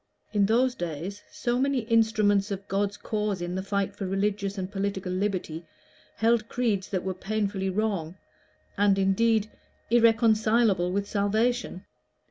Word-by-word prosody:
In 200 Hz, -2 st, +3 dB
those 245 Hz, +4 st, +3 dB
days 175 Hz, -, -5 dB
so 240 Hz, 0 st, -1 dB
many 275 Hz, -1 st, +1 dB
instruments 220 Hz, -3 st, +2 dB
of 200 Hz, -1 st, -5 dB
God's 200 Hz, +1 st, -1 dB
cause 210 Hz, -3 st, -2 dB
in 175 Hz, 0 st, -4 dB
the 190 Hz, -, -2 dB
fight 200 Hz, 0 st, -2 dB
for 200 Hz, -2 st, -4 dB
religious 200 Hz, +1 st, -1 dB
and 190 Hz, 0 st, -4 dB
political 195 Hz, -2 st, -3 dB
liberty 185 Hz, -4 st, -2 dB, 0.5 s
held 225 Hz, +1 st, +2 dB
creeds 220 Hz, -6 st, -1 dB
that 185 Hz, -3 st, -2 dB
were 190 Hz, -, -2 dB
painfully 195 Hz, 0 st, -2 dB
wrong, 190 Hz, -4 st, -2 dB, 0.6 s
and, 200 Hz, -1 st, +4 dB
indeed, 215 Hz, +3 st, +2 dB, 0.4 s
irreconcilable 225 Hz, -4 st, +3 dB
with 200 Hz, +1 st, -1 dB
salvation! 215 Hz, 0 st, 0 dB
200 Hz, 135 wpm, -27 LUFS, 190-220 Hz, 0.6 s, and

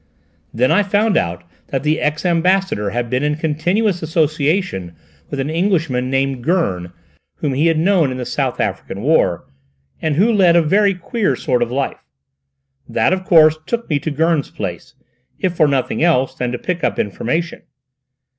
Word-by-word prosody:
Then 125 Hz, +5 st, +1 dB
I 185 Hz, +6 st, +4 dB
found 205 Hz, +2 st, +1 dB
out 85 Hz, +1 st, -1 dB, 0.2 s
that 135 Hz, -1 st, -3 dB
the 155 Hz, +1 st, +1 dB
ex 150 Hz, +3 st, -1 dB
Ambassador 180 Hz, -, +1 dB
had 120 Hz, +3 st, -2 dB
been 125 Hz, +2 st, -1 dB
in 150 Hz, 0 st, 0 dB
continuous 175 Hz, +6 st, 0 dB
association 155 Hz, -, -1 dB, 0.3 s
with 140 Hz, -, -5 dB
an 140 Hz, +3 st, -2 dB
Englishman 160 Hz, -8 st, 0 dB
named 135 Hz, -2 st, -1 dB
Gurn 95 Hz, -, 0 dB, 0.4 s
whom 145 Hz, -3 st, -2 dB
he 145 Hz, +5 st, +2 dB
had 165 Hz, -1 st, +2 dB
known 170 Hz, -3 st, +3 dB
in 130 Hz, -, -4 dB
the 125 Hz, -, -4 dB
South -, -, -2 dB
African 100 Hz, -, -3 dB
war, 140 Hz, -, +2 dB, 0.6 s
and 155 Hz, -2 st, 0 dB
who 215 Hz, +8 st, +3 dB
led 185 Hz, -5 st, +4 dB
a 170 Hz, -, +6 dB
very 195 Hz, +5 st, +3 dB
queer 200 Hz, +4 st, -1 dB
sort 125 Hz, -4 st, -1 dB
of 120 Hz, -, 0 dB
life. 135 Hz, +2 st, -2 dB, 0.9 s
That -, -, +2 dB
of 185 Hz, 0 st, -2 dB
course 155 Hz, -3 st, +5 dB
took 235 Hz, 0 st, -2 dB
me 145 Hz, -, +2 dB
to 155 Hz, -, -3 dB
Gurn's 155 Hz, 0 st, 0 dB
place, 90 Hz, -5 st, -6 dB, 0.4 s
if 180 Hz, -2 st, -1 dB
for 155 Hz, -2 st, +4 dB
nothing 135 Hz, -3 st, -1 dB
else 155 Hz, -6 st, +2 dB
than 125 Hz, -1 st, -3 dB
to 125 Hz, -, -3 dB
pick 180 Hz, +3 st, -4 dB
up 120 Hz, -5 st, 0 dB
information. 125 Hz, -, -2 dB
155 Hz, 175 wpm, -18 LUFS, 130-180 Hz, 0.9 s, a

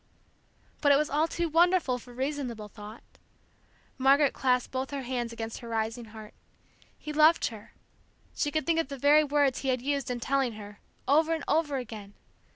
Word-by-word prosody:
But 285 Hz, -, +4 dB
it -, -, +7 dB
was 300 Hz, 0 st, -1 dB
all 305 Hz, +3 st, +2 dB
too 340 Hz, +1 st, -2 dB
wonderful 330 Hz, -5 st, +2 dB
for 245 Hz, -, -14 dB
reasonable 255 Hz, -4 st, -4 dB
thought. 210 Hz, +3 st, -11 dB, 1.0 s
Margaret 275 Hz, +2 st, +4 dB
clasped 250 Hz, -2 st, 0 dB
both 260 Hz, +1 st, -3 dB
her 280 Hz, -2 st, -5 dB
hands 240 Hz, -2 st, -3 dB
against 225 Hz, -1 st, -6 dB
her 235 Hz, -, -10 dB
rising 225 Hz, +1 st, -2 dB
heart. 215 Hz, -1 st, -12 dB, 0.6 s
He 300 Hz, -, -7 dB
loved 310 Hz, +2 st, +5 dB
her. 215 Hz, -3 st, -12 dB, 0.6 s
She 295 Hz, -, -1 dB
could 310 Hz, +1 st, -2 dB
think 330 Hz, -1 st, +2 dB
of 325 Hz, -, -1 dB
the 275 Hz, 0 st, -7 dB
very 290 Hz, +3 st, +5 dB
words 285 Hz, -2 st, +1 dB
he 270 Hz, -, -5 dB
had 255 Hz, -1 st, 0 dB
used 280 Hz, -1 st, -1 dB
in 245 Hz, -1 st, -3 dB
telling 265 Hz, -1 st, 0 dB
her, 205 Hz, -1 st, -11 dB, 0.3 s
over 315 Hz, +3 st, +3 dB
and 320 Hz, -, -6 dB
over 300 Hz, -3 st, +1 dB
again. 215 Hz, -5 st, -8 dB
265 Hz, 180 wpm, -28 LUFS, 235-295 Hz, 1.0 s, it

